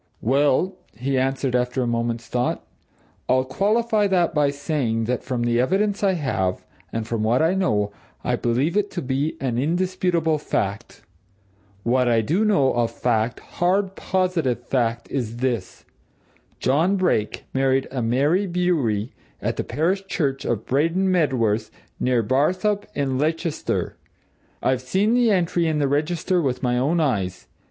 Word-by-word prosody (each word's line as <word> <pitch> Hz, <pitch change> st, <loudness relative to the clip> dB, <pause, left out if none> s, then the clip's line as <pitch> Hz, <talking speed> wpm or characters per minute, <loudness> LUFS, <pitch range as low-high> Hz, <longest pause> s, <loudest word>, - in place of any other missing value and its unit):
"Well," 145 Hz, -, +2 dB, 0.2 s
he 135 Hz, +3 st, -1 dB
answered 135 Hz, -1 st, 0 dB
after 125 Hz, +1 st, 0 dB
a -, -, -1 dB
moment's 115 Hz, 0 st, -1 dB
thought, 125 Hz, 0 st, -2 dB, 0.6 s
"I'll 130 Hz, 0 st, +3 dB
qualify 210 Hz, -, +1 dB
that 180 Hz, -3 st, +2 dB
by 150 Hz, -2 st, +3 dB
saying 140 Hz, -5 st, -1 dB
that 120 Hz, +2 st, -2 dB
from 125 Hz, -2 st, -2 dB
the 120 Hz, 0 st, +1 dB
evidence 200 Hz, +10 st, +1 dB
I 195 Hz, -1 st, +4 dB
have, 95 Hz, -, -1 dB, 0.3 s
and 115 Hz, -1 st, -3 dB
from 115 Hz, -2 st, -2 dB
what 120 Hz, +7 st, +2 dB
I 165 Hz, +3 st, +3 dB
know, 105 Hz, -, +1 dB, 0.3 s
I -, -, +1 dB
believe 130 Hz, +9 st, 0 dB
it 205 Hz, -1 st, +1 dB
to 175 Hz, -, -3 dB
be 135 Hz, +4 st, -1 dB
an 125 Hz, -3 st, -1 dB
indisputable 170 Hz, 0 st, +1 dB
fact. 100 Hz, -5 st, -3 dB, 0.8 s
What 125 Hz, +1 st, +2 dB
I 115 Hz, -2 st, +3 dB
do 165 Hz, -, +1 dB
know 195 Hz, -12 st, +3 dB
of 120 Hz, -1 st, +1 dB
fact, 115 Hz, -1 st, -1 dB
hard, 190 Hz, +2 st, 0 dB
positive 170 Hz, -10 st, 0 dB
fact, 120 Hz, -3 st, 0 dB
is 120 Hz, -4 st, -3 dB
this: 120 Hz, -6 st, -3 dB, 0.7 s
John 160 Hz, +9 st, +2 dB
Brake 180 Hz, -, 0 dB
married 135 Hz, 0 st, +2 dB
a 130 Hz, -2 st, -2 dB
Mary 145 Hz, -, +2 dB
Bewery 150 Hz, -, 0 dB, 0.3 s
at -, -, -2 dB
the -, -, -1 dB
parish 190 Hz, +6 st, -1 dB
church 135 Hz, -7 st, -1 dB
of 110 Hz, -2 st, -1 dB
Braden 165 Hz, +8 st, +1 dB
Medworth, 120 Hz, -, +1 dB, 0.3 s
near 125 Hz, -2 st, +2 dB
Barthorpe, 185 Hz, -, +1 dB
in 135 Hz, -2 st, -1 dB
Leicestershire: 160 Hz, +2 st, -1 dB, 0.7 s
I've 130 Hz, -1 st, +1 dB
seen 190 Hz, -, +1 dB
the 245 Hz, -1 st, +4 dB
entry 175 Hz, -3 st, +2 dB
in 155 Hz, -1 st, 0 dB
the 145 Hz, -2 st, +2 dB
register 160 Hz, +5 st, 0 dB
with 130 Hz, -3 st, -2 dB
my 125 Hz, -1 st, +1 dB
own 155 Hz, +7 st, +1 dB
eyes. 100 Hz, -, -1 dB
135 Hz, 150 wpm, -23 LUFS, 120-180 Hz, 0.8 s, I